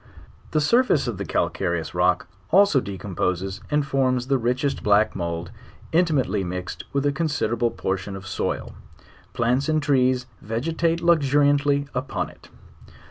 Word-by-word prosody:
The 155 - +1
surface 235 - +3
of 110 -5 -3
the 100 - -3
calcare 85 0 0
ous 80 - -7
rock 90 0 +2 0.2
also 195 -5 +5
decomposes 95 -1 -3
and 150 -1 +1
forms 130 -3 +1
the 135 0 +1
richest 125 +4 -1
black 105 +1 +3
mould 85 -2 -4 0.4
intimately 160 - +2
mixed 90 0 -5
with 140 0 0
a 145 - +3
considerable 135 -6 0
portion 95 -3 -3
of 95 -1 -9
soil; 95 - -3 0.6
plants 125 +5 +1
and 155 0 +3
trees 130 -4 +2 0.2
vegetate 165 +9 -1
luxuriantly 145 -3 +3
upon 130 +1 -3
it. - - -19
130 Hz, 135 wpm, -24 LUFS, 100-145 Hz, 0.6 s, also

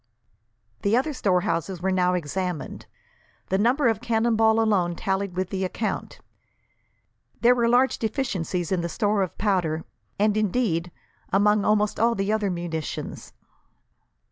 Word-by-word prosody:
The 205 +4 +2
other 295 +4 0
storehouses 185 - 0
were 190 +2 0
now 180 -1 +2
examined. 180 0 -4 0.6
The 190 - +1
number 245 +5 +3
of 225 -1 +1
cannonball 225 -1 +2
alone 190 -6 +2
tallied 190 0 -2
with 185 0 -2
the 190 -1 -2
account. 215 +4 -3 1.2
There 240 +1 +6
were 235 -1 +1
large 250 +2 +3
deficiencies 195 - -2
in 185 -2 +1
the 170 - -3
store 205 +4 0
of 185 -4 -3
powder, 175 -6 0 0.3
and, 210 +1 +2
indeed, 195 -5 0 0.4
among 205 +1 +3
almost 210 0 +1
all 230 +1 +3
the 195 +1 0
other 215 -2 0
munitions. 170 -3 -5
200 Hz, 135 wpm, -25 LUFS, 180-225 Hz, 1.2 s, There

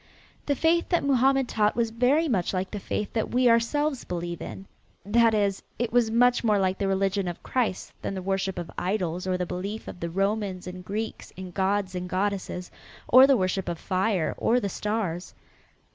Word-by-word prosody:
The 285 - +2
faith 335 +4 +2
that 345 - +2
Mohammed 270 -1 +3
taught 210 -2 +1
was 230 -1 0
very 260 +8 +2
much 195 - 0
like 185 +1 -2
the 210 - -4
faith 210 +2 -3
that 225 - -1
we 250 +1 +3
ourselves 260 +4 +2
believe 175 -1 -4
in. 195 - -7 0.4
That 225 +2 +4
is, 200 -2 +1 0.2
it 235 0 -2
was 240 -2 +4
much 245 +2 +3
more 215 -3 +3
like 190 -1 0
the 200 - 0
religion 195 0 0
of 175 - -6
Christ 235 -7 -1
than 195 - -3
the 190 - -4
worship 195 0 -1
of 175 -1 -5
idols 180 -2 -2
or 185 -1 +1
the 180 - -1
belief 200 +5 -5
of - - -8
the 170 - -3
Romans 195 0 -1
and 180 0 -7
Greeks 215 +4 -5
in 185 -1 -7
gods 195 +1 0
and 180 0 -4
goddesses, 185 -1 -2 0.4
or 260 +2 +8
the 275 -2 +5
worship 185 -1 -1
of 170 - -3
fire 185 -2 0
or 240 +2 +3
the 200 - -2
stars. 195 -4 -3
200 Hz, 195 wpm, -26 LUFS, 185-235 Hz, 0.4 s, or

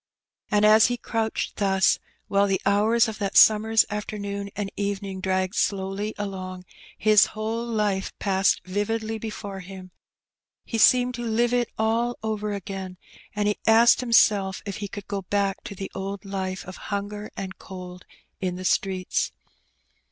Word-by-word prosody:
And 210 -1 +3
as 215 +1 +7
he 245 0 -1
crouched 225 -2 -2
thus, 195 -2 +3 0.3
while 200 0 +3
the 195 -1 +1
hours 220 +4 +3
of 220 -1 -6
that 200 -1 0
summer's 220 0 +6
afternoon 200 -1 -4
and 200 -1 -3
evening 200 -1 -3
dragged 185 0 0
slowly 200 0 -1
along, 185 -2 -5 0.3
his 215 -1 +5
whole 220 +2 -2
life 210 -4 -1
passed 195 -1 +1
vividly 220 +3 -2
before 205 -3 -6
him, 185 0 -10 0.7
he 225 - -3
seemed 250 +2 +5
to 240 - -5
live 235 +1 +1
it 245 -1 +1
all 230 +2 0
over 215 -1 -2
again, 195 -2 -6 0.4
and 210 0 0
he 210 - 0
asked 230 +2 +6
himself 205 -5 +3
if 200 -2 -5
he 205 - -4
could 200 0 -8
go 200 -1 -3
back 195 0 -1
to 200 - -7
the 195 0 -6
old 195 +1 -5
hfe 190 -2 -4
of 185 - -9
hunger 205 +1 -4
and 190 -1 -6
cold 180 -1 -9 0.4
in 180 -1 -2
the 185 +1 -7
streets. 185 -1 0
200 Hz, 155 wpm, -25 LUFS, 190-220 Hz, 0.7 s, as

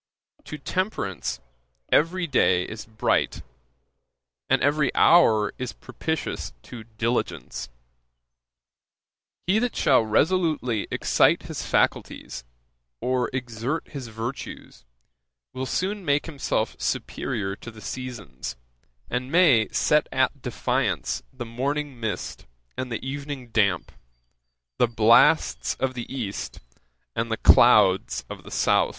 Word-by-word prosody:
To 150 - -6
temperance, 135 - -2 0.5
every 175 +3 +3
day 95 - +3
is 110 +2 -8
bright; 110 -1 0 1.1
and - - +4
every 145 -1 +2
hour 110 -12 +5
is 125 -1 -4
propitious 160 - -4
to 115 -3 -10
diligence. 115 - -2 1.8
He 195 +5 +3
that 245 +1 -1
shall - - +4
resolutely 145 - +1
excite - - +3
his - - -5
faculties, - - -1 0.6
or 125 -1 0
exert 125 +4 -3
his 135 -5 -7
virtues, 115 - -7 0.7
will 130 0 -4
soon 195 +6 -2
make 145 -3 +1
himself 150 -4 -2
superiour 95 -1 -2
to - - -9
the 110 -2 -12
seasons; 120 - -6 0.5
and 125 +2 -3
may 150 -11 +5
set 150 0 +2
at 130 +1 +1
defiance 115 - -1
the 120 - -7
morning 135 +3 -3
mist 110 -5 -4 0.3
and 130 -1 -4
the 115 +3 -4
evening 140 -2 -5
damp, 100 -6 +1 0.9
the 120 - +5
blasts 115 - +4
of 130 -1 -1
the 120 -2 -6
east, 115 -7 -4 0.6
and 115 0 -1
the 110 - 0
clouds 105 -5 +5
of - - -7
the - - -12
south.' - - +2
125 Hz, 115 wpm, -25 LUFS, 110-145 Hz, 1.8 s, hour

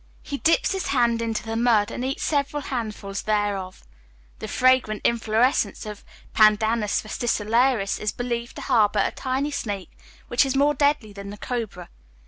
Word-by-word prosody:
He 280 -1 -5
dips 330 +3 +2
his 385 -1 -2
hands 235 -4 +2
into 225 -1 -2
the 225 0 -4
mud, 225 -3 +3
and 245 - -4
eats 265 +2 -2
several 285 -1 0
handfuls 215 -6 -4
thereof. 205 -3 -2 0.6
The - - -5
fragrant 255 -5 +2
inflorescence 230 0 +1
of 210 -1 -8 0.3
Pandanus 215 0 +3
fascicularis 225 0 +1
is 210 - -1
believed 240 0 -4
to - - -7
harbour 220 -6 +3
a - - -1
tiny 270 +2 -2
snake, 205 -9 -4 0.4
which 240 - +3
is 270 -1 -1
more 285 +2 +3
deadly 285 -8 +1
than 200 0 -8
the 205 - -8
cobra. 215 -8 -5
230 Hz, 155 wpm, -24 LUFS, 210-260 Hz, 0.6 s, mud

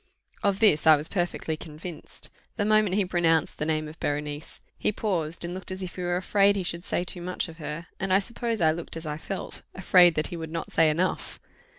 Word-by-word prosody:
Of 200 -1 +1
this 160 -9 +5
I 155 - +10
was 150 +2 0
perfectly 175 -3 -1
convinced. 155 +1 -8 0.2
The 205 - 0
moment 215 -3 +3
he 205 -2 +2
pronounced 165 -3 +1
the 150 - -1
name 155 -1 0
of 155 +2 -11
Berenice, 145 +1 -3 0.2
he - - 0
paused, 170 -6 -1
and 175 - -4
looked 185 0 -5
as 185 0 -4
if 180 - -6
he 180 - -5
were 175 0 0
afraid 200 +2 +3
he 195 - -1
should 170 0 -2
say 175 - -1
too 180 0 -5
much 180 +1 -2
of 165 -1 -11
her; 155 +1 -5
and 195 -1 -2
I 190 - +7
suppose 230 +1 -2
I 160 -1 +5
looked 165 0 -5
as 165 - -7
I 150 0 -4
felt 195 - -5
afraid 180 -2 +6
that 155 - 0
he 175 - -5
would 160 -1 -5
not 165 0 -4
say 160 -1 +5
enough. 175 +5 -1
175 Hz, 230 wpm, -27 LUFS, 160-190 Hz, 0.2 s, I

